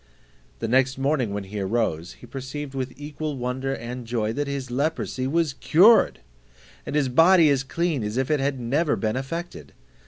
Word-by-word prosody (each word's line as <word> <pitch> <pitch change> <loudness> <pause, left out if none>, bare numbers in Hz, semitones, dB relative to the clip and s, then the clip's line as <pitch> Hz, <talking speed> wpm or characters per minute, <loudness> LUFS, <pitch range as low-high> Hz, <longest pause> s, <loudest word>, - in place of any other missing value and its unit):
The - - -3
next 130 +2 +2
morning 135 -5 0
when 100 0 -3
he 100 +2 -6
arose, 95 -5 -1
he - - -14
perceived 135 +1 -6
with 130 -1 -3
equal 150 0 -5
wonder 130 +2 -2
and 120 0 -7
joy, 110 -2 -1
that 145 +3 -2
his 135 -3 -4
leprosy 135 -1 -1
was 160 0 +1
cured, 190 - +5 0.7
and - - -3
his 145 -3 +2
body 165 +4 +5
as 135 -2 +2
clean 155 -1 -1
as 105 +3 -3
if 130 +2 0
it 150 - +2
had 135 -1 -1
never 145 +7 +1
been 110 +1 -1
affected. 135 - -6
135 Hz, 180 wpm, -24 LUFS, 120-150 Hz, 0.7 s, cured